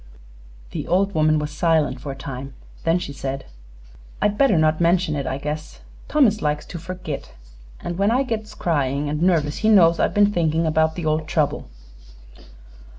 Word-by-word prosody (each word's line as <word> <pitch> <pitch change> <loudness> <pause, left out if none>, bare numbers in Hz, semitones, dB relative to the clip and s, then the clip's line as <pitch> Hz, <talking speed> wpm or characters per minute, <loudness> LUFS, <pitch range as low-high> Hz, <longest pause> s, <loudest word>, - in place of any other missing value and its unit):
The - - -5
old 195 +2 +1
woman 155 -1 +3
was 150 0 -3
silent 150 -4 +1
for 140 - -5
a - - -7
time. 135 0 -7 0.3
Then 165 +1 +3
she 160 -5 -5
said: 135 0 -5 0.7
"I'd 210 0 +1
better 265 -6 +3
not 155 +1 +2
mention 170 -2 +2
it, 140 -2 -3
I 130 - -2
guess. 150 +2 -6 0.3
Thomas 245 -9 +3
likes 150 0 -1
to 170 - -7
forgit, 175 - -7 0.5
an' 175 - -4
when 200 +2 +2
I 250 +4 +2
gets 220 -4 -4
cryin' 145 -3 0
an' 150 +3 -2
nervous 160 -5 +2
he 220 - +1
knows 170 -6 +5
I've - - +1
been 205 0 +4
thinkin' 165 -2 +1
'bout 160 0 +2
the 170 - -5
old 155 0 0
trouble." 145 - -1
160 Hz, 175 wpm, -22 LUFS, 150-185 Hz, 0.7 s, knows